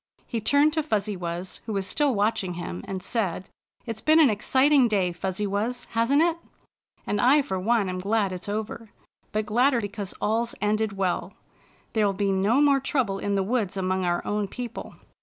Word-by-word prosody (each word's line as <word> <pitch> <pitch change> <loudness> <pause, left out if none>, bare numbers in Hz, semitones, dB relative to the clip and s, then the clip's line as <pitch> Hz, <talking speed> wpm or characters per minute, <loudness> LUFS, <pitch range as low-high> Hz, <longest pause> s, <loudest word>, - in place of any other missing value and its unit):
He 230 -3 -3
turned 285 +7 +3
to 315 - +1
Fuzzy 215 -8 -1
Wuzz, 175 +1 -5
who 220 - -3
was 195 -1 -1
still 275 +6 +1
watching 200 -3 0
him, 90 - -6
and 190 -1 -5
said: 190 -6 -2 0.2
" - - -42
It's 225 -2 -4
been 310 +1 +5
an 290 -7 +6
exciting 265 +5 +3
day. 195 -5 +1
Fuzzy 190 +3 -3
Wuzz, 215 +5 -2
hasn't 245 +7 +3
it? 340 0 +1 0.7
And 205 - 0
I 275 +4 +5
for 190 -6 -3
one 215 +1 +1
am 185 0 -3
glad 200 +1 0
it's 185 +2 -6
over, 220 +1 -4 0.4
but 215 0 -1
gladder 245 +3 +3
because 205 -2 -5
all's 230 +2 0
ended 210 0 0
well. 185 -1 -1 0.6
There'll 210 -3 +2
be 200 0 0
no 200 +8 +2
more 285 -2 +4
trouble 260 - -1
in 200 0 -1
the 195 - +1
woods 205 -2 -1
among 185 0 0
our 175 -1 0
own 210 -1 -1
people." 240 +2 -7
210 Hz, 190 wpm, -25 LUFS, 190-245 Hz, 0.7 s, an